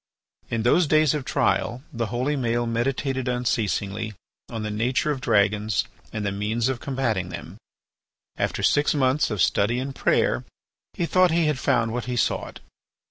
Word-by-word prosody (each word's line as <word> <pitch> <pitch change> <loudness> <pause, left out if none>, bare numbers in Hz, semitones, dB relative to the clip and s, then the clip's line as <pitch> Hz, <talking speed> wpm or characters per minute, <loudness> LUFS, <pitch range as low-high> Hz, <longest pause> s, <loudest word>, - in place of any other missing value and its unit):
In 115 -1 -1
those 155 +8 +4
days 155 -1 +4
of 145 -4 -3
trial, 125 +3 0
the 115 -1 -2
holy 125 +6 -1
Maël 120 -2 0
meditated 130 +2 -1
unceasingly 110 -3 -1 0.3
on 115 -2 -4
the 105 - -3
nature 125 +7 0
of 135 -3 -3
dragons 105 -1 +2 0.3
and 105 -1 -3
the 100 - 0
means 110 +5 -1
of 130 -3 -2
combating 120 -10 -1
them. - - -8 0.8
After - - -2
six 145 +1 +3
months 135 +1 +2
of 105 -5 +1
study 110 +6 +2
and 135 +2 -3
prayer - - +1 0.5
he 170 - 0
thought 185 +1 +4
he 165 0 +2
had 150 -3 0
found 120 -5 +1
what 120 -2 -3
he 125 0 -3
sought. 120 - -1
120 Hz, 165 wpm, -24 LUFS, 110-135 Hz, 0.8 s, those